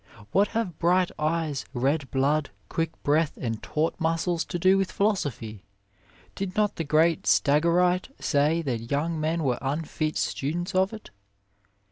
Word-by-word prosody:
What 200 Hz, +1 st, +4 dB
have 190 Hz, -8 st, -2 dB
bright 180 Hz, +1 st, +3 dB
eyes, 155 Hz, -2 st, -1 dB
red 135 Hz, +3 st, 0 dB
blood, 140 Hz, +2 st, +1 dB, 0.2 s
quick 165 Hz, -1 st, -1 dB
breath 150 Hz, +2 st, +1 dB
and 115 Hz, -3 st, -3 dB
taut 155 Hz, +2 st, -1 dB
muscles 165 Hz, +1 st, 0 dB
to -, -, -4 dB
do 185 Hz, +3 st, +4 dB
with 195 Hz, -1 st, 0 dB
philosophy? 140 Hz, -, -1 dB, 0.7 s
Did 190 Hz, -1 st, -4 dB
not 210 Hz, -1 st, +1 dB
the 165 Hz, -, -1 dB
great 160 Hz, +2 st, +2 dB
Stagirite 170 Hz, -, +3 dB
say 155 Hz, +3 st, +1 dB
that 115 Hz, -5 st, -3 dB
young 160 Hz, +3 st, -1 dB
men 160 Hz, +1 st, 0 dB
were 125 Hz, -3 st, 0 dB
unfit 155 Hz, +2 st, -2 dB
students 170 Hz, +6 st, -2 dB
of 190 Hz, +1 st, +2 dB
it? 220 Hz, -1 st, -10 dB
160 Hz, 145 wpm, -26 LUFS, 145-175 Hz, 0.7 s, What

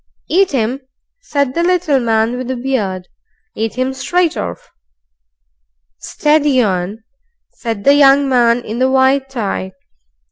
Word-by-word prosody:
"Eat 380 Hz, +2 st, +2 dB
'im!" 245 Hz, +2 st, -1 dB, 0.4 s
said 280 Hz, -, -1 dB
the 335 Hz, -, -1 dB
little 345 Hz, -5 st, +1 dB
man 225 Hz, 0 st, 0 dB
with 250 Hz, 0 st, -5 dB
the 260 Hz, -, -2 dB
beard; 210 Hz, -8 st, -3 dB, 0.5 s
"eat 225 Hz, +2 st, -3 dB
'im 260 Hz, +1 st, -1 dB
straight 335 Hz, +5 st, 0 dB
orf." 85 Hz, -1 st, -6 dB, 1.3 s
"Steady 295 Hz, -3 st, +1 dB
on!" 200 Hz, 0 st, -1 dB, 0.5 s
said 225 Hz, -4 st, -5 dB
the 280 Hz, -, +5 dB
young 280 Hz, -1 st, +5 dB
man 240 Hz, -2 st, +2 dB
in 220 Hz, +3 st, -5 dB
the 260 Hz, +1 st, +2 dB
white 265 Hz, +1 st, +2 dB
tie. 200 Hz, -6 st, -4 dB
255 Hz, 135 wpm, -16 LUFS, 225-280 Hz, 1.3 s, the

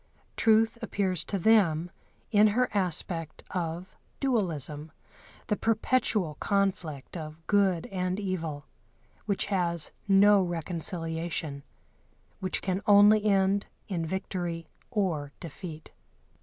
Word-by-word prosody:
Truth 225 Hz, +1 st, +3 dB
appears 195 Hz, -6 st, -1 dB
to 200 Hz, -, -2 dB
them 175 Hz, -5 st, +3 dB, 0.4 s
in 210 Hz, -1 st, +6 dB
her 250 Hz, +4 st, +2 dB
aspect 170 Hz, -4 st, -1 dB
of 175 Hz, 0 st, -4 dB, 0.2 s
dualism, 160 Hz, -, -2 dB, 0.5 s
the 210 Hz, -, 0 dB
perpetual 215 Hz, -, +1 dB
conflict 185 Hz, -9 st, -1 dB
of 160 Hz, -1 st, -8 dB
good 195 Hz, -4 st, +2 dB
and 185 Hz, 0 st, -1 dB
evil, 165 Hz, -7 st, -3 dB, 0.6 s
which 200 Hz, -2 st, +1 dB
has 170 Hz, -4 st, +1 dB, 0.2 s
no 200 Hz, +1 st, +6 dB
reconciliation, 165 Hz, -3 st, -3 dB, 0.8 s
which 185 Hz, -, -2 dB
can 190 Hz, 0 st, -1 dB
only 205 Hz, +1 st, +7 dB
end 200 Hz, 0 st, +2 dB, 0.2 s
in 175 Hz, -5 st, -2 dB
victory 175 Hz, -2 st, -4 dB, 0.2 s
or 170 Hz, -, -1 dB
defeat. 160 Hz, -1 st, -9 dB
185 Hz, 100 wpm, -28 LUFS, 165-205 Hz, 0.8 s, only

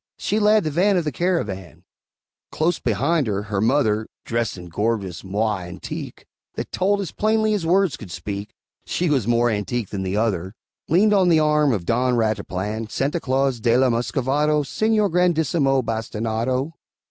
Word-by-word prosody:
She 210 Hz, -, 0 dB
led 210 Hz, 0 st, +4 dB
the 155 Hz, -, -2 dB
van 190 Hz, +5 st, +3 dB
of 175 Hz, -, +1 dB
the 150 Hz, -, -2 dB
caravan; 110 Hz, -, -2 dB, 0.7 s
Close 170 Hz, +3 st, 0 dB
behind 140 Hz, +6 st, +1 dB
her, 100 Hz, -1 st, -1 dB
her 100 Hz, -2 st, -2 dB
mother 110 Hz, -3 st, +2 dB, 0.2 s
(Dressed 115 Hz, -4 st, -2 dB
in 90 Hz, 0 st, -9 dB
gorgeous 100 Hz, 0 st, -2 dB
moire 100 Hz, -1 st, -1 dB
antique, 95 Hz, +1 st, -7 dB, 0.3 s
That -, -, -5 dB
told 200 Hz, +2 st, +1 dB
as 190 Hz, -, -5 dB
plainly 215 Hz, 0 st, +1 dB
as 185 Hz, -6 st, -1 dB
words 185 Hz, -2 st, +2 dB
could -, -, -10 dB
speak, 100 Hz, +4 st, -6 dB, 0.3 s
She 175 Hz, -3 st, -1 dB
was 130 Hz, -7 st, +1 dB
more 120 Hz, 0 st, +3 dB
antique 105 Hz, +1 st, -2 dB
than 100 Hz, -, -4 dB
the 95 Hz, +1 st, -2 dB
other) 100 Hz, -3 st, -1 dB, 0.3 s
Leaned 205 Hz, +6 st, +4 dB
on 190 Hz, -3 st, +4 dB
the 165 Hz, -2 st, +5 dB
arm 150 Hz, -2 st, +3 dB
of 100 Hz, -7 st, -2 dB
Don 125 Hz, +3 st, +1 dB
Rataplan, 110 Hz, -1 st, -2 dB
Santa 145 Hz, +9 st, -1 dB
Claus 135 Hz, -3 st, 0 dB
de 115 Hz, +1 st, +3 dB
la 130 Hz, -1 st, +3 dB
Muscovado, 140 Hz, +5 st, +1 dB
Señor 215 Hz, +5 st, +1 dB
Grandissimo 160 Hz, -6 st, +2 dB
Bastinado. 115 Hz, +5 st, -2 dB
125 Hz, 165 wpm, -22 LUFS, 105-165 Hz, 0.7 s, the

